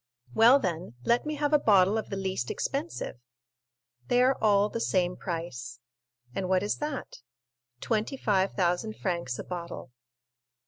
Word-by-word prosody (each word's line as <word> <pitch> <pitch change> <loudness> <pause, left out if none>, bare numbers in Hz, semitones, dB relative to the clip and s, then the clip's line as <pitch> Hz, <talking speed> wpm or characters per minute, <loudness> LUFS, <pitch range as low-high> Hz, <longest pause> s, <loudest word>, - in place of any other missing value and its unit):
"Well, 235 +5 +7
then, 175 - -3
let 240 +5 +2
me 305 - -2
have 295 0 0
a 300 - +6
bottle 200 -4 +4
of 220 - -2
the 195 - -3
least 190 -10 -2
expensive." 280 - -3 0.9
"They 245 0 +4
are 265 +1 +4
all 205 -1 +4
the 230 - -4
same 180 -4 +1
price." 145 -9 -5 0.6
"And 185 +4 -3
what 185 0 +3
is 205 - -1
that?" 295 - -5 0.6
"Twenty 220 +5 -1
five 195 -5 +1
thousand 185 +4 0
francs 170 -10 -2
a - - -5
bottle." 170 -7 -7
195 Hz, 150 wpm, -28 LUFS, 175-235 Hz, 0.9 s, Well